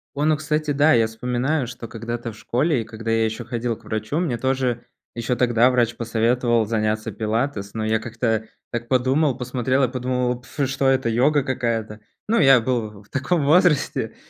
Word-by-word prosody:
Вон, 150 +2 +2
о, 155 - +2
кстати, 155 0 -1
да, 145 +2 +4
я 115 -2 +4
вспоминаю, 125 +5 -1
что 120 -1 -8
когда-то 115 +1 -5
в 105 - -14
школе, 125 +4 0
и - - -4
когда 115 0 -5
я 115 0 +2
ещё 110 0 -4
ходил 120 -1 -2
к - - -23
врачу, 110 +6 -3
мне 150 -10 -1
тоже 130 -1 -1 0.3
ещё 120 +1 -1
тогда 120 0 +3
врач 120 -2 +1
посоветовал 115 0 +1
заняться 110 0 -1
пилатес, 110 0 -2
но 110 -1 -3
я 110 0 +1
как-то 110 -1 -2 0.3
так 120 0 -4
подумал, 130 +2 +2
посмотрел, 130 +1 0
я 130 - +4
подумал: 125 0 -2
"Пф, 135 +2 -3
что 135 0 0
это, 130 -2 +2
йога 135 +5 +3
какая-то?" 115 -5 -2 0.3
Ну, 230 +2 +2
я 135 -3 +7
был 110 -4 -3
в 100 - -26
таком 140 +3 0
возрасте, 155 -1 +2
120 Hz, 185 wpm, -22 LUFS, 115-135 Hz, 0.3 s, я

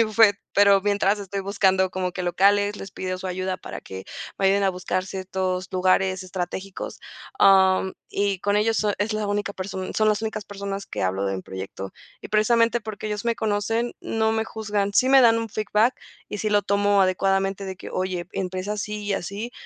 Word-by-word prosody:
mi - - +7
bufete, 215 -2 +4
pero 200 -1 +5
mientras 205 0 +1
estoy 200 0 -4
buscando 190 -1 +2
como 185 0 -2
que 180 - -4
locales, 200 +3 +3
les 195 - -8
pido 185 -1 -4
su 190 - -6
ayuda 185 0 -2
para - - -8
que 95 0 -9 0.3
me 195 - +1
ayuden 200 +1 +3
a 195 - +3
buscar 185 0 -2
ciertos 185 -1 -3
lugares 185 0 +2
estratégicos, 185 +1 -5 0.4
am, 190 -1 +5 0.2
y 200 -2 0
con 205 +1 +1
ellos 220 +1 +1
es 210 +2 0
la 215 -1 -1
única 205 0 -1
person 190 -1 -5
son 215 0 +3
las 210 -1 +2
únicas 215 -1 -3
personas 200 -1 -5
que - - -4
hablo 95 +1 0
de 95 - -1
un 95 - -6
proyecto 95 0 -7 0.3
y - - -8
precisamente 230 +2 +3
porque 215 -1 -6
ellos 210 0 -3
me 235 -1 +1
conocen, 220 +3 -1
no 220 0 0
me 220 0 0
juzgan, 210 -2 -2
si 255 +5 +4
me 270 0 +7
dan 230 -2 +6
un 230 0 -3
feedback 215 +3 +1 0.3
y 210 - -5
sí 215 +1 -1
lo 205 0 +3
tomo 200 0 +2
adecuadamente 195 +1 +1
de 190 -1 -5
que: - - -9
"Oye, 185 -2 -2
empieza 185 +1 -3
así 210 0 -4
y 205 - -1
así, 200 +5 -4
200 Hz, 200 wpm, -24 LUFS, 185-210 Hz, 0.4 s, mi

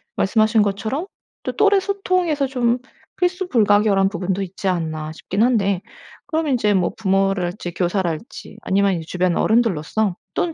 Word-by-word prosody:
말씀하신 215 +2 +3
것처럼 220 - -2 0.3
또 - - -4
'또래 405 -1 +4
소통에서 370 -7 0
좀 250 -2 +1 0.4
필수불가결한 215 - +2
부분도 190 -1 -2
있지 190 +1 -5
않나.' 160 -4 -2
싶긴 190 +5 -3
한데 200 -6 +2 0.5
그럼 320 -3 -1
인제 220 -5 +2
뭐 180 -2 +1
부모랄지 195 -3 0
교사랄지 180 +3 -3
아니면 195 +1 +2
이제 165 -2 -5
주변 180 -1 0
어른들로서 215 -3 +1 0.2
또는 335 - 0
205 Hz, 335 characters per minute, -21 LUFS, 185-250 Hz, 0.5 s, 또래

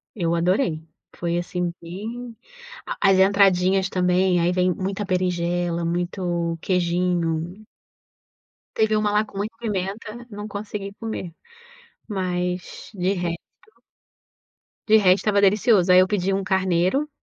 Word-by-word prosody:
eu 170 -5 0
adorei. 170 - +1 0.3
Foi 170 0 -2
assim 175 0 -2
bem 225 +8 -7 0.5
a - - -4
as 190 -1 +4
"entradinhas" 190 -1 +4
também 180 0 +2
aí 170 +1 +2
vem 180 0 +2
muita 195 +3 -3
berinjela, 175 -2 -1
muito 175 -1 -2
"queijinho". 175 +1 -1 1.1
Teve 220 -1 +2
uma 210 -1 +1
lá 210 +1 +3
com 210 - -12
muita 210 +3 -3
pimenta, 215 +2 -4
não 205 +1 -6
consegui 205 -1 -6
comer. 220 -5 -6 0.8
Mas, 180 -3 -3
de 190 -1 0
resto 175 -3 -3 1.5
de 220 0 +7
resto 185 -3 +5
estava 205 -1 +3
delicioso, 200 -1 +4
aí 180 - +8
eu 185 - +5
pedi 195 -1 0
um 195 0 -1
carneiro. 190 - +1
185 Hz, 125 wpm, -23 LUFS, 175-205 Hz, 1.5 s, aí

